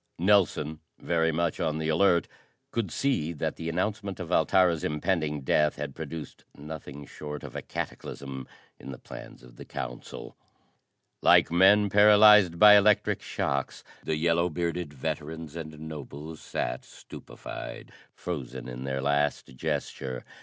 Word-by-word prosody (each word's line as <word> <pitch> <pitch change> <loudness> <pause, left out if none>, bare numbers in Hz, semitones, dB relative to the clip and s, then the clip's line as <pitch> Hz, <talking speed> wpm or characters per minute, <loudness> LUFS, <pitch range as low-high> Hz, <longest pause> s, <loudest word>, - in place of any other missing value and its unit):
Nelson, 85 -5 +2 0.2
very 80 -1 +1
much 85 0 -1
on 80 -2 0
the 80 0 -2
alert, 85 +2 +3 0.4
could 115 -5 -1
see 85 - 0
that 75 - -3
the 80 - -5
announcement 100 +3 -2
of 90 -2 -6
Altara's 85 -1 +3
impending 75 -1 -1
death 75 +3 +2
had 75 -1 -5
produced 80 0 -8
nothing 75 -1 -8
short 75 +1 -8
of - - -9
a - - -3
cataclysm 65 -2 -6 0.3
in - - -8
the 65 - -7
plans - - -11
of - - -16
the - - -9
council. 60 -1 -7 0.9
Like - - +5
men 100 +4 +6
paralyzed 105 -2 +7
by 105 +3 +9
electric 105 0 +3
shocks, 70 -1 -3 0.2
the 80 - -1
yellow 85 +2 +2
bearded 85 -1 -3
veterans 80 +2 -5
and 80 -2 -7
nobles 75 0 -8
sat - - -3
stupefied, 60 -1 -9 0.2
frozen 65 -7 -6
in 65 +1 -6
their 65 0 -2
last 70 -2 0
gesture. 65 0 -4
80 Hz, 140 wpm, -28 LUFS, 70-90 Hz, 0.9 s, by